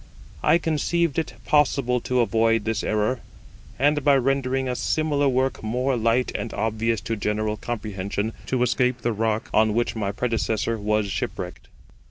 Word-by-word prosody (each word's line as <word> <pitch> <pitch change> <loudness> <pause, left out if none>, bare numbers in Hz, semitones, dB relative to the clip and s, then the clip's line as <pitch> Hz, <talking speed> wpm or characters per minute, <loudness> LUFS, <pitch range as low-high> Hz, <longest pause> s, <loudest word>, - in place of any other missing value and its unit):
I - - +5
conceived 165 0 0
it 160 - -3
possible 135 -4 +2
to 125 +1 +1
avoid 115 0 +2
this 110 -1 -1
error; 110 +4 0 0.6
and, 145 +2 +2
by 140 -1 +5
rendering 135 0 0
a 125 - -1
similar 145 0 +1
work 130 +1 0
more 125 +4 0
light 115 +2 +1
and 115 - -4
obvious 110 +1 0
to 115 - -2
general 105 0 -1
comprehension, 105 -2 -3
to 130 -2 +1
escape 125 0 +1
the 120 - 0
rock 110 0 -1
on 110 0 +3
which 120 0 0
my 100 -3 -1
predecessor 115 0 -1
was 105 0 +1
shipwrecked. - - -4
120 Hz, 155 wpm, -24 LUFS, 110-130 Hz, 0.6 s, I